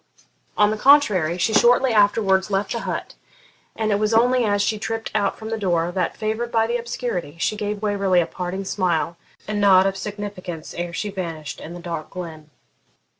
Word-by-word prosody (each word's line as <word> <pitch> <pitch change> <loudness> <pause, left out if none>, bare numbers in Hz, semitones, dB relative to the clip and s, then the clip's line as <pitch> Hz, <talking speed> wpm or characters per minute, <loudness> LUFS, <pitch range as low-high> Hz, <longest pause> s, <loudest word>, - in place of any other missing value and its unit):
On 210 0 +4
the 215 - -3
contrary, 210 - +4
she 220 +5 +1
shortly 245 +2 +4
afterwards 200 -2 +3
left 195 0 -1
the 235 - -1
hut, - - -4 0.6
and 220 -1 -1
it 205 - +2
was 215 +1 +1
only 245 +2 +4
as 205 -1 +1
she 215 0 0
tript 225 +1 -4
out 205 -2 0
from 220 - -7
the 225 - -2
door, 175 -3 0
that, 180 -1 -2
favoured 220 +2 -2
by 225 -1 +3
the 235 +1 0
obscurity, 230 - -4
she 190 - 0
gave 210 0 -4
Waverley 200 -3 +2
a 170 - +2
parting 185 +3 -5
smile 175 -4 0 0.3
and 210 0 -2
nod 190 -2 +6
of 195 0 0
significance 195 -4 -6
ere 175 0 -4
she 205 +4 -3
vanished 165 -6 -6
in 170 - -8
the - - -8
dark 170 -3 -5
glen. 160 -4 -8
200 Hz, 190 wpm, -22 LUFS, 175-220 Hz, 0.6 s, nod